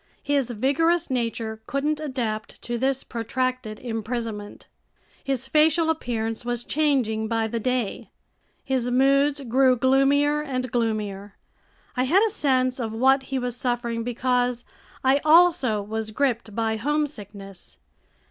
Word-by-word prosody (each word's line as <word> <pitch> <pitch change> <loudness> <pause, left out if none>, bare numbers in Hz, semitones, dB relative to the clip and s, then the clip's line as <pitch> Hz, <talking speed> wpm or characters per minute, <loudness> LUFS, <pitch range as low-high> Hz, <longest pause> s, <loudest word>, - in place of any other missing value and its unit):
His 280 -3 0
vigorous 285 +8 +1
nature 230 -3 -2
couldn't 295 +3 -1
adapt 245 -8 -4
to 240 0 -3
this 265 +1 0
protracted 245 -1 -3
imprisonment. 225 -2 -5 0.6
His 265 -1 -1
facial 320 +3 +3
appearance 225 -7 -3
was 240 0 -2
changing 255 -8 0
by 225 0 0
the 230 +1 -2
day. 250 -2 -2 0.6
His 255 -2 0
moods 275 +3 +3
grew 260 +1 +3
gloomier 275 +4 +3
and 255 -4 -3
gloomier. 210 -4 -2 0.6
I 255 - +1
had 365 +10 +4
a 440 - 0
sense 260 - +1
of 225 -3 -3
what 265 +4 +4
he 270 - -1
was 245 -2 -2
suffering 240 -2 -2
because 245 0 0 0.4
I 270 +2 +3
also 310 -10 +4
was 220 +1 -4
gripped 235 -3 -1
by 225 -1 0
homesickness. 210 -9 -4
250 Hz, 130 wpm, -24 LUFS, 225-275 Hz, 0.6 s, had